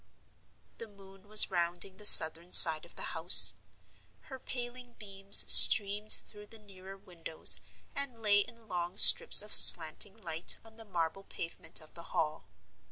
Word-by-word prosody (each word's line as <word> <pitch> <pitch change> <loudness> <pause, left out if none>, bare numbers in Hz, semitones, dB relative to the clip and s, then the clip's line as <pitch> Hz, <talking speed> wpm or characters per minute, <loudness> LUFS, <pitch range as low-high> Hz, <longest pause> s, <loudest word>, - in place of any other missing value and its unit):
The 230 - -15
moon 195 -1 -26
was 215 -1 0
rounding 175 +2 -10
the 210 - -3
southern 165 +1 +3
side 160 -2 +7
of - - -26
the - - -14
house. - - 0 0.7
Her 265 -2 -19
paling 245 -1 -16
beams 195 -2 -1
streamed 210 +1 +3
through 210 0 -12
the 225 - -18
nearer 195 -2 -22
windows, 170 -4 -5 0.3
and 275 -4 -10
lay 205 -2 -6
in 230 +2 -15
long 175 0 -13
strips 480 - +4
of - - -11
slanting 205 +1 +1
light 165 -4 -4
on 225 0 -25
the 225 - -21
marble 180 0 -12
pavement 165 -1 -7
of 155 - -22
the 170 - -18 0.2
Hall. 155 -1 -11
195 Hz, 155 wpm, -23 LUFS, 175-220 Hz, 0.7 s, side